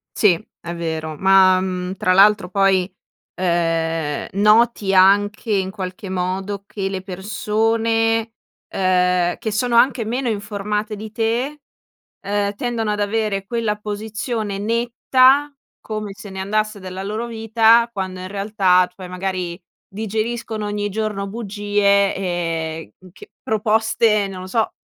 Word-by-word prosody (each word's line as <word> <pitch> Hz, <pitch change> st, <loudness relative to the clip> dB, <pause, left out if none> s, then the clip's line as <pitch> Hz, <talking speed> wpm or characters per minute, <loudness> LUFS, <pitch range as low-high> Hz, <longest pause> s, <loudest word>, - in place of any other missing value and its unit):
Sì 185 Hz, -6 st, +3 dB, 0.2 s
è 170 Hz, 0 st, -6 dB
vero 160 Hz, -2 st, -4 dB
ma, 190 Hz, -1 st, +5 dB
mhmm, 185 Hz, 0 st, -3 dB
tra 185 Hz, -1 st, +1 dB
l'altro 195 Hz, -1 st, +5 dB
poi, 195 Hz, -1 st, +2 dB, 0.4 s
ehm, 165 Hz, -3 st, -1 dB
noti 210 Hz, 0 st, +3 dB
anche 205 Hz, +4 st, +4 dB
in 190 Hz, -1 st, 0 dB
qualche 190 Hz, -1 st, -6 dB
modo 190 Hz, +2 st, -3 dB
che 195 Hz, -1 st, -4 dB
le 190 Hz, -1 st, -4 dB
persone, 225 Hz, +4 st, 0 dB, 0.3 s
ehm, 180 Hz, -2 st, +1 dB
che 220 Hz, -, -4 dB
sono 235 Hz, +3 st, 0 dB
anche 255 Hz, -1 st, +4 dB
meno 245 Hz, +4 st, -2 dB
informate 210 Hz, 0 st, -3 dB
di 215 Hz, +1 st, -8 dB
te, 240 Hz, +6 st, -1 dB, 0.6 s
ehm, 205 Hz, 0 st, -1 dB
tendono 230 Hz, -1 st, -2 dB
ad 210 Hz, 0 st, -1 dB
avere 205 Hz, -1 st, -1 dB
quella 225 Hz, -2 st, -1 dB
posizione 210 Hz, 0 st, -4 dB
netta, 250 Hz, +6 st, +3 dB, 0.3 s
come 215 Hz, -2 st, -5 dB
se 205 Hz, +1 st, -11 dB
ne 190 Hz, -1 st, -7 dB
andasse 215 Hz, +1 st, -1 dB
della 185 Hz, 0 st, -6 dB
loro 215 Hz, +4 st, -3 dB
vita, 225 Hz, 0 st, +3 dB
quando 185 Hz, -4 st, -5 dB
in 185 Hz, -, -6 dB
realtà 195 Hz, -3 st, +2 dB
cioè 185 Hz, -1 st, -9 dB
magari, 180 Hz, -1 st, -3 dB, 0.3 s
digeriscono 220 Hz, +1 st, -3 dB
ogni 205 Hz, 0 st, -2 dB
giorno 210 Hz, -1 st, -2 dB
bugie, 205 Hz, -2 st, +1 dB
ehm, 165 Hz, -, -3 dB, 0.2 s
ch -, -, -13 dB, 0.2 s
proposte, 220 Hz, -1 st, +2 dB
non 190 Hz, -1 st, -7 dB
lo -, -, -7 dB
so, 220 Hz, +2 st, 0 dB
205 Hz, 130 wpm, -20 LUFS, 185-220 Hz, 0.6 s, ma